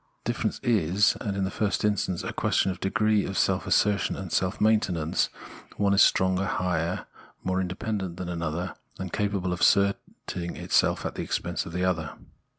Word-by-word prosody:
The - - 0
difference - - -2
is, 100 -3 +3
in 100 -2 -2
the 95 - -1
first 105 0 0
instance, 100 -4 0
a - - -4
question 95 - +1
of 90 - -7
degree 105 +1 +2
of 95 - -4
self - - +1
assertion 105 -1 +2
and 95 -3 -6
self 95 +2 0
maintenance: 95 -7 +2 0.5
one 100 -1 +2
is 100 - +5
stronger, 95 +1 +3
higher, 90 -2 -1 0.4
more 95 0 0
independent 95 -1 -3
than 90 -1 -5
another, 85 +1 -3 0.2
and 95 -2 -6
capable 100 -3 0
of 85 - -4
asserting 100 -3 +1
this - - +3
at - - -1
the - - -4
expense 85 +2 -2
of - - -7
the 90 +1 0
other. 85 -4 -1
95 Hz, 170 wpm, -27 LUFS, 90-100 Hz, 0.5 s, is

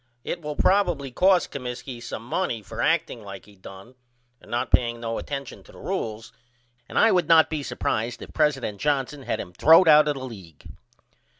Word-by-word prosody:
It 175 - -4
will 150 -1 -5
probily 175 -8 +1
cost 185 +5 +3
Comiskey 125 -1 -6
some 115 - -7
money 135 - -2
for 110 +3 -6
acting 165 -7 0
like 100 -2 -10
he 105 0 -18
done 95 +4 -13 0.5
and - - -18
not 120 +1 -2
paying 120 -1 +2
no 115 -1 -3
attention 140 -2 -6
to - - -18
the - - -16
rules 115 +1 -5 0.6
and - - -5
I 225 - +5
would 180 -1 +2
not 165 -1 +5
be 155 -2 -2
supprised 120 -3 -3
if - - -12
president 135 -9 0
Johnson 145 -1 -1
had - - -3
him 90 - -7
throwed 165 - +6
out 150 -1 +7
of 150 - 0
the 130 -1 -6
league. 95 - -12
130 Hz, 190 wpm, -24 LUFS, 115-155 Hz, 0.6 s, out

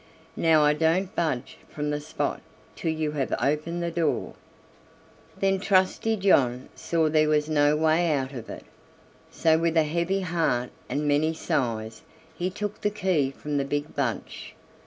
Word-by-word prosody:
Now 160 -2 +4
I 150 0 +4
don't 165 +5 +1
budge 155 -8 -2
from 150 0 -3
the 150 - -1
spot 155 +2 -3 0.3
till 165 - -2
you 155 -1 -2
have 140 -3 -2
opened 160 +4 -1
the 170 - -2
door." 165 -3 -1 1.1
Then 195 -1 +2
Trusty 200 +3 +2
John 130 -10 +2
saw 165 -2 0
there 155 0 +3
was 150 0 +2
no 150 -1 +3
way 160 +2 +2
out 135 -2 -1
of 120 -4 -8
it, - - -8 0.6
so 160 -1 +2
with 165 0 +1
a 160 - +6
heavy 170 +5 -1
heart 160 -9 0 0.2
and 150 +1 -1
many 155 +3 +2
sighs 115 -7 -2 0.3
he 180 +1 -2
took 205 +2 -5
the 210 - +2
key 185 -9 0
from 145 +2 -4
the 140 - +1
big 145 +2 -3
bunch. 125 -7 -4
155 Hz, 160 wpm, -26 LUFS, 145-170 Hz, 1.1 s, a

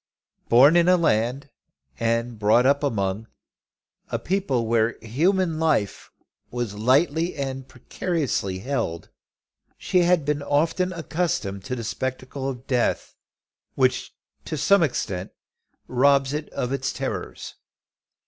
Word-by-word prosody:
Born 135 +7 +7
in 175 +1 +4
a 180 - +6
land 135 -2 0 0.5
and 115 0 -1
brought 110 +4 +4
up 140 +1 +3
among 105 -4 -1 0.8
a - - -1
people 175 -11 -1
where 115 0 +1
human 165 - +1
life 150 -11 0 0.4
was 120 -4 -3
lightly 145 +10 +2
and 135 -2 -4
precariously 130 - -2
held, 95 -7 -3 0.7
she 180 - +1
had 175 -3 +3
been 150 0 0
often 165 +6 +1
accustomed 165 - -2
to 125 - -3
the 120 - -5
spectacle 130 +3 -4
of 130 -1 -7
death, 125 -3 0 0.6
which - - 0 0.3
to 155 - -4
some 200 +7 +4
extent 100 - -2 0.5
robs 135 +1 +3
it 150 0 -4
of 125 +2 -3
its 135 -1 -1
terrors. - - -5
135 Hz, 120 wpm, -24 LUFS, 115-160 Hz, 0.8 s, Born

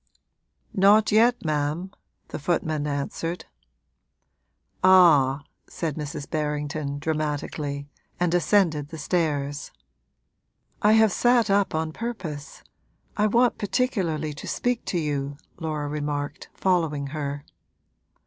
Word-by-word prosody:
'Not 205 +3 +5
yet, 230 0 +4
ma'am,' 155 +4 -1 0.4
the - - -5
footman 155 -1 -1
answered. 150 +4 -3 1.4
'Ah!' 155 -7 +6 0.2
said 160 -3 -3
Mrs. 145 -2 -5
Berrington, 150 -1 -2
dramatically, 145 -2 -3 0.3
and 175 -1 +1
ascended 170 -4 +2
the 160 - -8
stairs. 145 -3 -1 1.1
'I 210 +1 +5
have 220 -1 +5
sat 240 0 +3
up 200 -4 +2
on 160 0 -1
purpose 185 -11 -6 0.5
I 210 0 +2
want 240 +3 +3
particularly 190 - -1
to 145 - -9
speak 245 -1 -1
to 180 - -1
you,' 145 -3 -2 0.2
Laura 155 -3 -3
remarked, 145 -1 -4
following 160 -6 +1
her. 145 -2 -4
155 Hz, 105 wpm, -25 LUFS, 145-190 Hz, 1.4 s, Ah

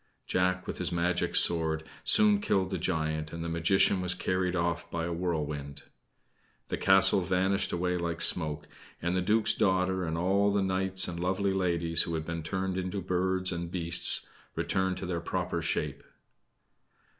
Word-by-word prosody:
Jack, 90 0 0
with - - -6
his - - -1
magic 85 +1 -1
sword, 80 -2 +3 0.2
soon 210 -1 +6
killed 95 - 0
the 95 - -2
giant, 80 -3 -2
and 85 0 -6
the - - -4
magician 85 +3 +2
was 90 -1 0
carried 90 0 -1
off 85 -1 -2
by 85 -1 -3
a 85 - -3
whirlwind. 75 -5 -4 0.9
The - - -2
castle 95 0 +5
vanished 95 +2 0
away 90 +1 -1
like 85 -1 -3
smoke, 75 -3 +2 0.3
and 85 +2 -2
the 95 - +1
duke's 105 +4 +2
daughter 95 -2 0
and 80 -1 -3
all 100 +4 +1
the 100 -1 0
knights 95 0 0
and 85 -1 -6
lovely 95 +2 -1
ladies 85 -3 +2
who 85 - -2
had 80 -1 -4
been 85 -1 -4
turned 95 +3 -3
into 95 +2 -4
birds 95 0 -1
and 85 -1 -4
beasts 85 -1 +1 0.3
returned 95 -1 -1
to - - -5
their 85 -2 -3
proper - - -3
shape. 70 -2 -3
90 Hz, 165 wpm, -29 LUFS, 85-95 Hz, 0.9 s, soon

